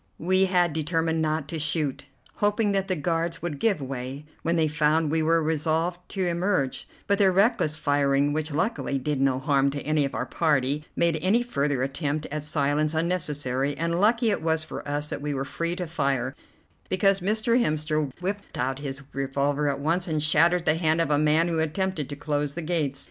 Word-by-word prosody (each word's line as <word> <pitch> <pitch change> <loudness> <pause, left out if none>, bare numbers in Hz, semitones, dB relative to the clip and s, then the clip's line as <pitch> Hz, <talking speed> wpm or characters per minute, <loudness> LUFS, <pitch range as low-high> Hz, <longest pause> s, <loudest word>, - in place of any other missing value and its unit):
We 185 +3 +2
had 180 -3 +2
determined 160 +1 0
not 155 -2 -1
to 165 - -3
shoot, 150 -3 0 0.3
hoping 210 0 +1
that 195 -1 0
the 185 - 0
guards 165 +2 -2
would 155 -5 -3
give 205 -3 +2
way 135 +1 -6 0.2
when 170 +1 0
they 160 -2 +2
found 150 +1 +1
we 160 0 +1
were 165 +1 +2
resolved 160 +3 0
to 190 -2 -2
emerge; 175 -5 -1 0.2
but 200 0 +1
their 195 -2 +5
reckless 195 -5 +2
firing, 145 -1 +2
which 155 +1 -2
luckily 165 - -1
did 135 +1 -2
no 135 -1 +2
harm 140 0 +2
to 140 +1 -4
any 155 0 +1
of 140 - -3
our 125 - -2
party, 145 -1 0
made 170 -2 +1
any 210 +8 +3
further 140 - -1
attempt 145 +2 -2
at 150 0 -2
silence 150 +1 0
unnecessary, 145 -5 -1
and 170 +2 0
lucky 230 +2 +3
it 200 - -1
was 160 0 +1
for - - -7
us 145 +1 -1
that - - -4
we 145 -1 -2
were 135 0 -2
free 170 +4 -2
to 180 -1 -3
fire, 140 -5 -1 0.6
because 195 +1 +3
Mr. 220 +5 +1
Hemster 155 - -1
whipped 200 +2 -4
out 130 +2 -1
his 140 -1 -5
revolver 140 +2 0
at 140 0 -2
once 165 +5 0
and 155 -2 -1
shattered 165 +3 +3
the 160 - +4
hand 160 -1 +2
of 165 -3 +1
a 145 - +3
man 155 +2 +3
who 165 -2 0
attempted 160 -1 -1
to 145 - -5
close 145 -1 -2
the 170 - -4
gates. 155 -5 -1
155 Hz, 195 wpm, -26 LUFS, 145-175 Hz, 0.6 s, their